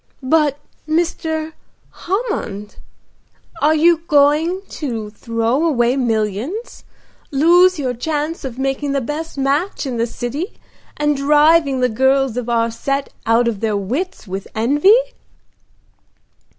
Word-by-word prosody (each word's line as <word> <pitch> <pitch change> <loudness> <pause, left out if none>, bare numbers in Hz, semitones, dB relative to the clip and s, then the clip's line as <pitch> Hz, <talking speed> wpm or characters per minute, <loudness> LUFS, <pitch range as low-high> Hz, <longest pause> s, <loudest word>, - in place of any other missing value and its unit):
"But 290 +1 +2 0.3
Mr. 320 -1 -1 0.4
Hammond? 350 - -4 0.8
Are 310 +2 +4
you 330 +1 +4
going 300 +6 +3
to 230 -8 -5
throw 230 +6 -1
away 250 -6 +2
millions, 235 - -2 0.5
lose 350 +6 +4
your 260 -4 -2
chance 305 +5 -3
of 255 -3 -6
making 270 +1 -1
the 275 - +1
best 300 +5 -5
match 285 +7 0
in 255 -3 -3
the 230 +1 0
city, 275 - -5 0.4
and 295 0 +1
driving 295 0 +3
the 250 - +4
girls 265 +1 +1
of 245 -1 -3
our 230 -1 +1
set 275 +4 -3
out 230 +1 +3
of 225 -4 -2
their 215 -1 0
wits 255 - -4
with 190 +1 -5
envy?" 290 - +4
275 Hz, 125 wpm, -18 LUFS, 235-315 Hz, 0.8 s, Are